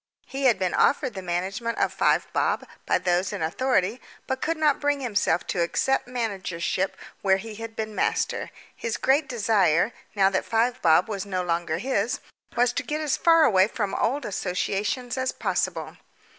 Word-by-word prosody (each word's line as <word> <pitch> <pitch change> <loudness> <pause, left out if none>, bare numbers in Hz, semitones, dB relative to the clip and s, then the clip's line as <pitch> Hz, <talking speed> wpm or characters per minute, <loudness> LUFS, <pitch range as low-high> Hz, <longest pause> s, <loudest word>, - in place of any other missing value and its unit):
He 270 0 -4
had 240 -6 +5
been 185 -2 -1
offered 265 -3 +2
the 190 - -6
management 190 +6 -2
of - - +1
Five - - +2
Bob - - 0 0.2
by - - +3
those 180 +1 0
in - - -3
authority, 220 +4 0 0.2
but 265 0 -3
could 330 +1 0
not 305 -2 +2
bring 290 -1 +1
himself 210 -8 0
to 175 - -1
accept 265 +9 +1
managership 195 -6 -2 0.2
where 190 -1 +3
he 215 +3 -8
had 225 +1 -8
been 215 -1 -4
master. - - -1 0.3
His 230 - -3
great 275 +2 +2
desire, 205 -5 +2 0.2
now 195 -1 +4
that 190 - 0
Five 240 +3 0
Bob 165 +1 +4
was 200 -3 -3
no 185 -2 -1
longer 170 -2 -1
his, 225 +1 -1 0.4
was 245 0 +3
to - - -1
get 300 +1 -3
as 305 -3 0
far 330 -1 +5
away 195 -8 +5
from 205 -3 -3
old 270 +2 0
associations 205 +6 -2
as 260 0 0
possible. - - -2
220 Hz, 175 wpm, -25 LUFS, 185-255 Hz, 0.4 s, had